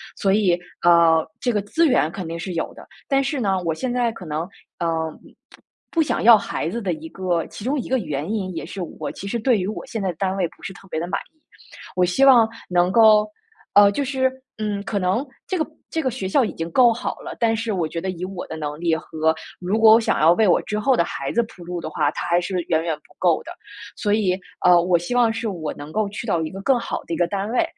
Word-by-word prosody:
所 195 - +1
以， 190 -4 +3 0.2
呃， 165 -2 +5
这 250 -3 0
个 210 - +1
资 325 +11 +2
源 205 - +2
肯 185 -1 -6
定 165 +1 -5
是 180 +2 -5
有 165 - -2
的。 - - -12 0.2
但 275 -1 +2
是 275 +1 -2
呢， 195 -3 +1
我 165 - +1
现 250 +10 -3
在 245 -1 +1
可 220 - -11
能， 155 0 -2 0.4
呃， 165 -1 -1 0.4
不 - - -19 0.3
不 330 - +2
想 300 - -1
要 225 -1 +9
孩 165 - -3
子 230 +7 -3
的 190 -4 -1
一 160 0 -8
个 180 -3 -1
其 - - -10
中 280 +3 0
一 - - -5
个 260 - +2
原 150 - -3
因， 195 -4 -2
也 - - -4
是 195 - -7 0.2
我 - - -3
其 200 - -8
实 235 +4 -2
对 235 +1 +3
于 180 - -2
我 215 - -5
现 225 - -4
在 190 - -1
的 175 - -4
单 190 +3 -1
位 180 - +1
不 - - -24
是 - - -6
特 195 - -16
别 160 - -2
的 170 - -3
满 - - -1
意。 315 - -38 0.6
我 180 - +3
希 180 +10 +3
望 245 -5 +7 0.2
能 180 0 +2
够 215 -1 +6 0.5
呃， 200 0 +7
就 280 - -1
是， 260 -1 0 0.3
嗯， 210 -2 -2
可 205 - -3
能 185 +7 +1 0.2
这 375 - -1
个 315 - +1 0.3
这 320 - -1
个 265 - 0
学 225 -6 -4
校 260 +8 +3
已 220 - -2
经 165 0 -4
够 245 +4 +6
好 230 - -4
了， - - -8
但 225 -1 +2
是 225 -1 -2
我 175 -5 -1
觉 165 - -5
得 190 - -3
以 180 -1 -4
我 185 -1 -6
的 160 - -6
能 150 -1 -5
力 170 -1 +1
和 160 0 -1 0.2
如 185 +4 -1
果 220 -1 +8
我 225 - +7
想 225 - 0
要 160 +2 +7
为 215 +3 +3
我 175 - +4
之 210 0 -3
后 260 +4 +2
的 - - +4
孩 140 -4 -4
子 235 - +2
铺 195 -5 -12
路 175 0 -5
的 165 - -6
话， 145 - +1
它 - - -5
还 175 0 +3
是 185 +1 -2
远 160 -1 +2
远 165 -2 -1
不 150 - -25
够 175 -3 +2
的。 - - -9 0.4
所 205 - -1
以， 190 -4 +1 0.3
呃， 175 -1 +7
我 175 0 +3
希 175 +7 -4
望 240 -2 +4
是 225 +1 -3
我 160 -5 -4
能 145 +1 -9
够 210 +4 0
去 210 +3 -6
到 170 -6 +1
一 155 - -3
个 190 - -8
更 265 0 +3
好 - - -4
的 - - -5
一 - - -1
个 175 - +2
单 200 +3 -3
位， 245 - +3
195 Hz, 290 characters per minute, -22 LUFS, 170-225 Hz, 0.6 s, 要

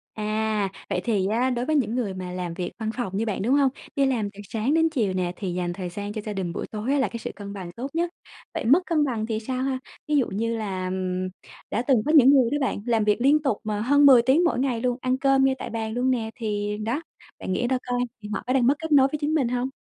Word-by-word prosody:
À, 215 -1 -1 0.2
vậy - - -1
thì 205 -5 +1
á 235 +5 +1
đối 245 -1 -1
với 310 - +1
những 245 -5 +1
người 220 -6 -1
mà 185 -1 -6
làm 180 -2 -4
việc 175 0 -4
văn 220 -1 -2
phòng 195 -6 -2
như 225 - 0
bạn, 210 -4 -2
đúng 240 +7 +2
hông? 280 -2 +4 0.3
Đi 275 - +3
làm 230 -6 0
từ 200 - -14
sáng 230 +6 0
đến 325 0 +3
chiều 225 -11 0
nè 180 -1 -1
thì 185 -3 -4
dành 175 -1 -2
thời 180 -1 -5
gian 205 +3 -5
cho 215 - -4
gia 210 - -3
đình 185 -4 -3
buổi - - -4
tối 215 +4 -2
á 285 - +2
là 265 - +2
cái 230 - -6
sự - - -5
cân 200 -1 -8
bằng 185 -3 -7
tốt 245 +7 -5
nhất. 340 +1 +1 0.4
Vậy - - -3
mất 280 +9 +6
cân 315 -4 +2
bằng 230 -5 -2
thì 220 -1 -2
sao 255 +3 -3
ha? 265 -1 -1 0.3
Ví 300 - +1
dụ 270 - +3
như 230 +3 -2
là, 190 -4 -3
ừm, 185 0 -2 0.4
đã 230 - 0
từng 265 - +5
có 300 - +2
những 270 -2 +8
người 260 -4 +5
đó 290 - +1
bạn, 265 - 0
làm 230 -3 +2
việc 210 +3 +2
liên 290 +3 +4
tục 270 -8 0
mà 210 -1 -2
hơn 285 +4 +4
10 260 -4 +8
tiếng 270 +8 +3
mỗi 295 -8 +1
ngày 250 -4 0
luôn, 245 -1 0
ăn 255 0 +1
cơm 270 0 +3
ngay 265 - +2
tại - - -5
bàn 220 -1 -3
luôn 250 +2 +1
nè, 225 -3 -1
thì 210 -2 -2
đó, 230 +8 -2 0.4
bạn 185 - -3
nghĩ 240 - 0
ra 260 +1 +1
coi, 245 0 0 0.2
thì 210 - -8
họ - - -2
có 255 - +1
đang 255 -3 +3
mất 275 - +4
kết 320 0 -5
nối 275 -2 +6
với 300 - -3
chính 295 +2 0
mình 290 -6 +2
hông? 250 +2 -1
230 Hz, 285 wpm, -25 LUFS, 205-265 Hz, 0.4 s, những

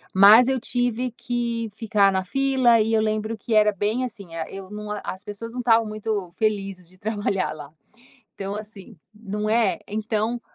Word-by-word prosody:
mas 210 +6 +8
eu 265 -1 +1
tive 245 0 -1
que 235 -1 -3
ficar 210 -3 +3
na 190 0 0
fila 260 +2 +3
e 220 +1 +1
eu 220 - +4
lembro 215 +1 -1
que 225 +2 -4
era 210 0 +5
bem, 215 +6 -1
assim, 200 -8 -9
ah, 165 -1 -4
eu 195 -1 -9
não 210 0 -7
a 210 - -4
as 185 +2 -6
pessoas 210 +2 -7
não 250 - -6
estavam 230 -2 +4
muito 215 -4 -3
felizes 195 -4 -2
de 185 - -21
trabalhar 205 -2 -1
lá. 145 -2 -9 0.7
Então, 195 0 -4
assim 210 -1 -10 0.2
não 210 0 -4
é? 225 -3 +2
Então 220 +2 -1
215 Hz, 180 wpm, -24 LUFS, 200-230 Hz, 0.7 s, mas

